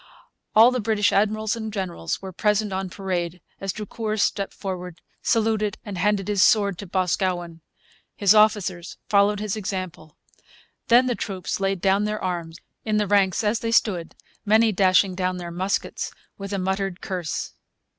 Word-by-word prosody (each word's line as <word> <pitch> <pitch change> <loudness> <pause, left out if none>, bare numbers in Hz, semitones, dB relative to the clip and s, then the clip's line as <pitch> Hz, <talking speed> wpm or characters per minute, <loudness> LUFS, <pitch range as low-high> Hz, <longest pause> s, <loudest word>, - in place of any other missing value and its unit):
All 225 +3 +8
the 255 - -1
British 215 -1 +1
admirals 215 +1 +1
and 220 -1 -5
generals 185 - -4
were 190 - -6
present 210 +1 0
on 190 0 -3
parade 180 -2 -3 0.2
as 195 -1 -2
Drucour 215 +2 -4
stepped 200 -1 0
forward, 180 -3 -6 0.2
saluted, 220 -2 +1
and 205 -2 -6
handed 200 0 0
his 205 -2 +1
sword 200 -4 +4
to 200 - -7
Boscawen. 180 -2 -1 0.5
His 200 0 +4
officers 205 -5 +2
followed 200 0 +3
his 210 -1 -2
example. 185 -6 -5 0.7
Then 245 +1 +6
the 250 - +1
troops 195 -6 -4
laid 195 -2 -1
down 195 +1 +2
their 210 0 -2
arms, 170 -3 -4 0.3
in 215 -1 0
the 210 - +2
ranks 200 -1 +2
as 215 +2 +1
they 230 - -3
stood, 185 -7 +1 0.3
many 220 +2 +4
dashing 185 0 +3
down 185 0 -1
their 175 -1 -6
muskets 185 +3 -2 0.3
with 195 0 -7
a 200 - -1
muttered 190 0 -2
curse. 180 -5 -4
195 Hz, 160 wpm, -24 LUFS, 185-210 Hz, 0.7 s, All